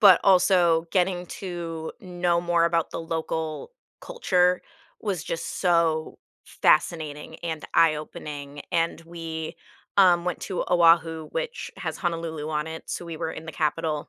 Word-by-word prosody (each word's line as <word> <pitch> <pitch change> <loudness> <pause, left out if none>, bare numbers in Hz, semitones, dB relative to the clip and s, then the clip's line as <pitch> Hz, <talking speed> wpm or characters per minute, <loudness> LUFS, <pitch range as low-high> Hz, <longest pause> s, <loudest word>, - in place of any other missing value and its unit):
but 200 -4 +8
also 180 -3 +5
getting 180 -1 +1
to 170 -3 -5
know 175 -2 0
more 170 -1 +2
about 170 -1 +1
the - - -4
local 160 - -3 0.3
culture 180 - +2 0.4
was 195 -7 -2
just 165 - -4
so 165 -3 +2 0.3
fascinating 150 -3 +1
and 160 -2 -4
eye-opening. 150 -3 0
And 165 0 +1
we, 165 -1 -6 0.4
um, 180 -3 +6
went 180 -1 -2
to 185 - -2
Oahu, 165 -2 +4
which - - -4
has - - -4
Honolulu 165 -4 -3
on 150 0 -1
it, 160 0 -7
so 175 - -4
we 165 -2 -7
were 160 - -2
in 160 - -8
the 160 - -7
capital 155 0 -1
165 Hz, 140 wpm, -26 LUFS, 160-180 Hz, 0.4 s, but